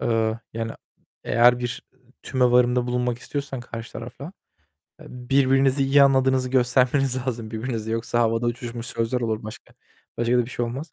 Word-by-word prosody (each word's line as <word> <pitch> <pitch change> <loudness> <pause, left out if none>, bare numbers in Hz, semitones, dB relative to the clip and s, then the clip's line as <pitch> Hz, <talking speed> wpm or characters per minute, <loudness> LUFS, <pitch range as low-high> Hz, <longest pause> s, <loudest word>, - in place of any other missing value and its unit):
Eee, 115 -1 0
yani, 115 0 -4 0.5
eğer 120 +1 +4
bir 120 0 -4 0.4
tümevarımda 125 -1 +2
bulunmak 125 -1 -1
istiyorsan 140 -2 -5
karşı 115 -1 -8
tarafa, 120 +3 -8 0.8
eee, - - -13
birbirinizi 135 +2 +2
iyi 140 +1 +5
anladığınızı 130 -1 +3
göstermeniz 130 +1 +2
lazım 115 -3 -4
birbirinizi. 110 -1 -4
Yoksa 115 +1 -1
havada 115 0 +1
uçuşmuş 120 0 -4
sözler 115 +2 -2
olur 110 -2 -2
başka, 110 - -10 0.4
başka 120 +1 +2
da 120 - +2
bir 120 - -10
şey 120 - -2
olmaz. 130 +7 -6
125 Hz, 150 wpm, -24 LUFS, 115-130 Hz, 0.8 s, iyi